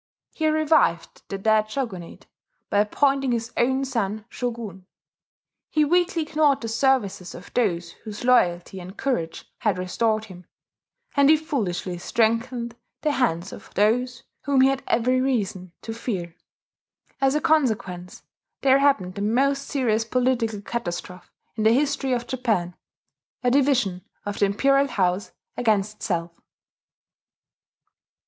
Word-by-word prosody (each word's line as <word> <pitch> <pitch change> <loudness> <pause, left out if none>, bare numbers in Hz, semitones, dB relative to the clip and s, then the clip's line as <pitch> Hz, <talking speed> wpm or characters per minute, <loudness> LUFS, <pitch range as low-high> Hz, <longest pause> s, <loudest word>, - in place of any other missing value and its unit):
He 315 - 0
revived 310 - +2
the 195 - -3
dead 215 +1 +2
shogunate 215 -9 -5 0.5
by 205 - +3
appointing 270 +5 +2
his 230 0 -2
own 265 +3 +1
son 215 -5 -2
shogun; 225 -7 -5 0.8
he 305 -1 +3
weakly 350 +1 +2
ignored 300 -3 +2
the 230 - -4
services 225 -7 0
of 180 - -12
those 175 -8 0
whose 215 -1 -7
loyalty 190 -7 +2
and 185 +3 -10
courage 170 -12 -2
had 210 -5 +1
restored 215 +4 0
him; 180 -4 -13 0.7
and 280 0 +5
he 315 - +7
foolishly 200 - -3
strengthened 235 +4 0 0.3
the 305 - +1
hands 195 - 0
of 220 - -12
those 245 +5 +1 0.2
whom 280 -2 +3
he 265 - +6
had 270 0 -1
every 255 +2 +2
reason 200 -9 -1
to 225 - -5
fear. 190 -8 -4 0.9
As 270 +1 +3
a - - +3
consequence 220 - 0 0.4
there 270 0 +5
happened 245 -11 +2
the 200 - -6
most 275 +6 +1
serious 230 -5 +1
political 230 -3 0
catastrophe 180 -5 -5 0.3
in 215 - -2
the 220 +1 +5
history 275 0 +1
of 240 -1 -1
Japan, 220 -9 -1 0.7
a 245 - +3
division 245 -9 +2 0.2
of 205 0 -4
the - - +5
imperial 275 +7 +3
house 190 -4 0 0.2
against 215 -3 +1
itself. 170 -4 -2
230 Hz, 135 wpm, -24 LUFS, 195-270 Hz, 0.9 s, he